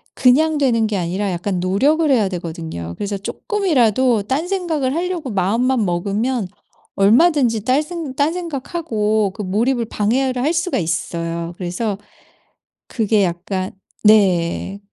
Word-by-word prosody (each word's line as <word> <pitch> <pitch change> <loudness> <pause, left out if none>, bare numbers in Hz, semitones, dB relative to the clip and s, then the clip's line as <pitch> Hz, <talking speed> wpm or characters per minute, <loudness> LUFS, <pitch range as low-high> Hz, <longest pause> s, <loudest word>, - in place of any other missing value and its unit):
그냥 300 +5 +4
되는 230 -6 +2
게 205 -2 -2
아니라 185 +4 -2
약간 180 +1 -2
노력을 285 - +2
해야 220 -7 +3
되거든요. 165 - -6
그래서 200 0 -3
쪼끔이라도 255 - +1
딴 275 - -1
생각을 320 -8 -1
하려고 345 -4 -2
마음만 225 +5 +1
먹으면 200 +6 -1 0.5
얼마든지 230 - +3
딸 260 +5 +2
생 325 -4 -6
딴 290 +4 +1
생각 335 -4 -5
하고 215 - 0
그 215 - -6
몰입을 230 +5 0
방해를 250 +5 0
할 300 - +2
수가 345 +2 0
있어요. 170 0 -3
그래서 195 +3 -3 0.9
그게 215 -3 +1
약간 185 +2 -2 0.3
네. 195 -2 +3
220 Hz, 290 characters per minute, -19 LUFS, 190-275 Hz, 0.9 s, 그냥